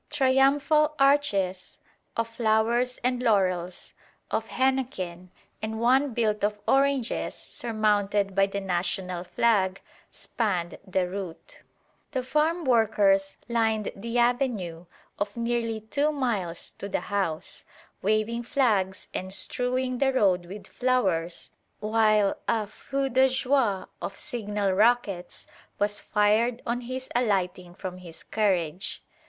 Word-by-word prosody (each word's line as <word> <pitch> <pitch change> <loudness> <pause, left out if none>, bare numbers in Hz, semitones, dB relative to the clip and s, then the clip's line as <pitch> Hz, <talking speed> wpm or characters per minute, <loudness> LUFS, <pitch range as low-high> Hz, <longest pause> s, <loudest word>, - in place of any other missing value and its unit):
Triumphal 290 +2 +3
arches 210 -10 +2 0.4
of 230 0 +1
flowers 230 +2 +1
and 250 0 +1
laurels, 185 -6 0 0.4
of 225 - -1
henequen, 240 -10 -1 0.3
and 220 0 -3
one 255 +2 +3
built 215 -3 0
of 210 0 +1
oranges 275 -3 +1
surmounted 205 -3 0
by 195 +1 +3
the 200 0 -3
national 180 -1 -2
flag, 195 -2 +1 0.3
spanned 185 -7 -2
the 185 -1 0
route. 180 -3 -7 0.5
The 260 -2 -1
farm 310 +5 +1
workers 205 -5 +3
lined 220 -3 +1
the 230 +4 -4
avenue 235 -9 0 0.3
of 205 +2 -3
nearly 230 -1 -1
two 285 +7 0
miles 215 - -2
to 200 - -5
the - - -1
house, 190 -6 -2 0.4
waving 215 +3 +1
flags 220 -7 0
and 185 +1 -4
strewing 250 +4 +1
the 270 -1 +3
road 185 -8 +2
with 200 +3 -9
flowers, 190 -10 0 0.3
while 215 -1 +2
a 220 -2 +1
feu 275 +6 -3
de 260 +1 +4
joie 255 -6 +1 0.2
of 195 - -5
signal 210 -7 -2
rockets 205 -3 +1 0.3
was 205 0 0
fired 220 +3 +2
on 245 +1 -1
his 255 +2 -5
alighting 185 -6 0
from 185 -1 -6
his 170 -3 -10
carriage. 185 -4 -1
220 Hz, 120 wpm, -27 LUFS, 195-250 Hz, 0.5 s, de